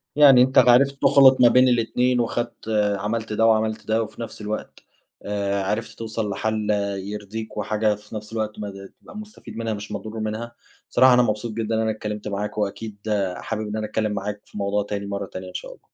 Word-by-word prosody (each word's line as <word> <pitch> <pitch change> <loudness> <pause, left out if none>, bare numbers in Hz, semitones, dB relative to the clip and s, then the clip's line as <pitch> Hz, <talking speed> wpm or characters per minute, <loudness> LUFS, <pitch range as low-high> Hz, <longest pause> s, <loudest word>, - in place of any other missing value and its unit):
يعني 140 -4 +8
أنتَ 130 +1 +2
عرفت 135 +3 +5
تخلط 135 -2 +6
ما 120 - +8
بين 125 +2 +5
الاتنين، 125 +1 +2
وخدت 120 -1 -3
آآ، 105 -2 +1
عملت 110 +2 -3
ده، 115 +1 +2
وعملت 110 0 +1
ده، 110 +1 +2
وفي 110 +2 -9
نفس 115 - -7
الوقت 105 +1 -5 0.4
آآ، 100 -1 -1
عرفت 105 +4 -3
توصل 110 -1 -3
لحَلّ 110 +1 -1
آآ، 100 -1 0
يرضِيك، 105 +3 -6
وحاجة 105 -1 +1
في 105 +1 -12
نفس 105 +1 -7
الوقت 110 -1 -3
ما 105 - -4 0.3
تبقى 210 - -12
مستفيد 210 - -10
منها 115 -1 -2
مش 105 0 -7
مضرور 110 +1 -5
منها. 110 +2 -4 0.3
بصراحة 130 0 +6
أنا 125 - +6
مبسوط 110 0 -1
جدًا 110 0 -2
إن 110 - +1
أنا 110 - +1
اتكلَّمت 105 -1 -5
معاك، 105 +1 -4
وأكيد 105 +1 -3
آآ، 100 -4 -1
حابِب 110 -1 -4
إن 105 - -4
أنا 110 - -2
أتكلَّم 110 0 -1
معاك 100 0 -4
في - - -12
موضوع 100 0 0
تاني 100 0 -4
مرَّة 100 0 -3
تانية 95 -1 -8
إن - - -13
شاء - - -6
الله. - - -14
110 Hz, 210 wpm, -23 LUFS, 105-115 Hz, 0.4 s, يعني